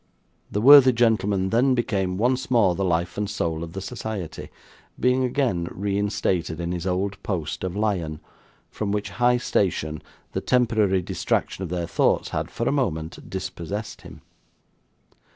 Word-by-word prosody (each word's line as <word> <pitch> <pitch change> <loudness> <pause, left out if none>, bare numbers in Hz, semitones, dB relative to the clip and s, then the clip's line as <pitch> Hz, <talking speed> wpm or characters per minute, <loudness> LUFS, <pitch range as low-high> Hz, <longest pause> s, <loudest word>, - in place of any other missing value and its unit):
The 105 - -1
worthy 135 0 +9
gentleman 105 -5 +1
then 130 +3 +3
became 95 -6 -1
once 125 +4 0
more 115 -8 +4
the 95 - -2
life 85 +1 0
and 105 -1 -1
soul 85 -6 -2
of 85 0 -8
the 95 - -5
society; 95 -2 -6 0.5
being 125 +1 +2
again 120 -10 0
reinstated 100 -4 -1
in 85 0 -3
his 90 +1 -3
old 95 +2 -2
post 85 -6 -3
of 90 0 -3
lion, 90 -8 -1 0.5
from 105 -2 -3
which 105 0 -2
high 125 0 +5
station 80 -9 -1 0.3
the - - -2
temporary 110 -7 +2
distraction 90 - -2
of 90 - -5
their 90 -1 -2
thoughts 85 - +1
had - - -3
for - - -3
a - - +3
moment 90 - -2
dispossessed 95 +2 -5
him. - - -12
100 Hz, 150 wpm, -24 LUFS, 90-115 Hz, 0.5 s, worthy